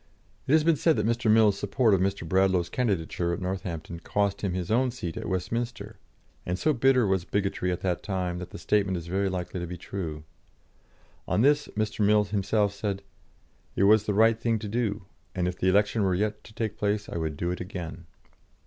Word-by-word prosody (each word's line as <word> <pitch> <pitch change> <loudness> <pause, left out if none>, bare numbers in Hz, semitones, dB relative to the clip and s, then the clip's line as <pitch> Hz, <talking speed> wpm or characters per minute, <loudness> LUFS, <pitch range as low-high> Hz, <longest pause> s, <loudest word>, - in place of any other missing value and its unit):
It 135 - +2
has 155 -1 +5
been 165 -1 +3
said 160 +1 +3
that - - 0
Mr. 115 0 +1
Mill's 110 -2 +5
support 110 +2 +2
of 95 - +3
Mr. 95 -3 -1
Bradlaugh's 95 -1 +2
candidature 90 -6 -1
at 85 - -3
Northampton 90 -3 -4
cost 100 +3 -1
him 95 -3 -1
his 90 +1 -3
own 125 +3 +3
seat 90 -10 -5
at - - -5
Westminster, 105 +2 -3 0.4
and 90 +1 -2
so 155 +9 +2
bitter 130 -1 +3
was 95 -3 +1
bigotry 95 -1 -1
at 90 - -3
that 90 -2 -1
time 90 -3 -2
that 90 - -7
the - - -9
statement 95 +2 +1
is 85 - -6
very 95 +3 0
likely 90 0 -4
to 85 - -4
be 90 +1 -6
true. 80 -4 -5 1.0
On - - +1
this, 145 +2 +3
Mr. 110 0 0
Mill 105 +1 +5
himself 100 0 0
said: 100 -1 -3 0.7
"It - - +2
was 105 +1 +5
the 105 - 0
right 110 +1 +4
thing 115 -1 +1
to 110 0 -6
do, 105 -3 -2 0.3
and 90 -1 0
if 90 0 -4
the 95 - +2
election 105 +3 +2
were 95 -2 +2
yet 105 +2 -1
to 110 - -14
take 110 -2 -3
place, 105 0 0
I - - -5
would 80 -2 -3
do 85 +2 -1
it 90 - -4
again." 90 -2 -7
100 Hz, 210 wpm, -27 LUFS, 90-110 Hz, 1.0 s, has